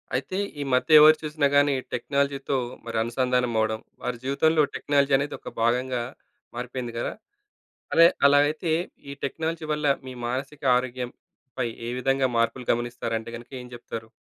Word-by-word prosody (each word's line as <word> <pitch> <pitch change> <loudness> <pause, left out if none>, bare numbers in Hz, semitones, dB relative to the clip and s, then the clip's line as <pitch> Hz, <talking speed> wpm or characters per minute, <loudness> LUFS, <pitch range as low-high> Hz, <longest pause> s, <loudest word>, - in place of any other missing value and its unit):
అయితే 140 +8 -2 0.2
ఈ - - 0
మధ్య 155 +5 +6
ఎవరు 155 +1 +9
చూసినా 150 -1 +1
గాని 145 0 +5 0.2
టెక్నాలజీతో 140 +2 -1 0.3
మరి 115 -1 -3
అనుసంధానమవ్వడం, 115 -2 0 0.2
వారి 125 -1 -3
జీవితంలో 155 +4 +3
టెక్నాలజీ 140 -1 +1
అనేది 140 +2 -3
ఒక - - -8
భాగంగా 125 +2 +1 0.5
మారిపోయింది 125 0 -5
కదా. - - -2 0.8
అదే 165 +1 +8 0.2
అలా 145 0 +6
అయితే 155 +2 -2 0.4
ఈ - - -5
టెక్నాలజీ 160 +3 -3
వల్ల 150 0 -1 0.2
మీ 130 - -6
మానసిక 135 +4 -4
ఆరోగ్యంపై 125 0 -5 0.2
ఏ - - -2
విధంగా 135 0 +2
మార్పులు 115 +2 0
గమనిస్తారంటే 115 -1 -3
గనక 120 +1 -12
ఏం 125 - -11
చెప్తారు? 115 -1 -8
130 Hz, 140 wpm, -25 LUFS, 120-145 Hz, 0.8 s, ఎవరు